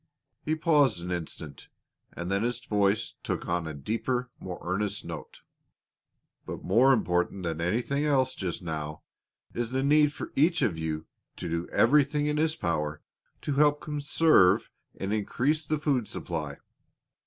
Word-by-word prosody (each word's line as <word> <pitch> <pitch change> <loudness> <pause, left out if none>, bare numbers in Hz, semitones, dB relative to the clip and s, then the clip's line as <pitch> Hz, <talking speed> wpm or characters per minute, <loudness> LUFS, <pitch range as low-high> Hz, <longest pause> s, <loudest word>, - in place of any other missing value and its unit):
He 155 - 0
paused 145 - +3
an 90 - -4
instant, 80 -4 -6 0.4
and 85 +2 -5
then 100 +1 +1
his 120 +1 -1
voice 105 -4 +1
took - - -3
on 85 -2 -1
a 80 - -4
deeper, 115 - -2
more 90 -2 -6
earnest 100 +3 -2
note. - - -8 1.0
"But - - -7
more 120 +8 +5
important 90 -5 +1
than 85 -1 -2
anything 120 - 0
else 130 -3 +2
just 90 -2 -4
now 75 -2 -4 0.5
is 120 -1 -2
the 130 +1 0
need 150 +1 +5
for - - -7
each 165 +4 +3
one 120 - +3
of 80 - -8
you 80 0 -3 0.3
to - - -5
do 85 +1 -2
everything 145 0 +3
in 150 0 0
his 160 +1 +2
power 75 - -2 0.4
to 145 - -1
help 145 +1 +4
conserve 150 - +3 0.3
and 95 +2 -2
increase 140 +8 0
the 155 - +1
food 140 -6 0
supply. 75 -4 -4
110 Hz, 155 wpm, -28 LUFS, 85-145 Hz, 1.0 s, more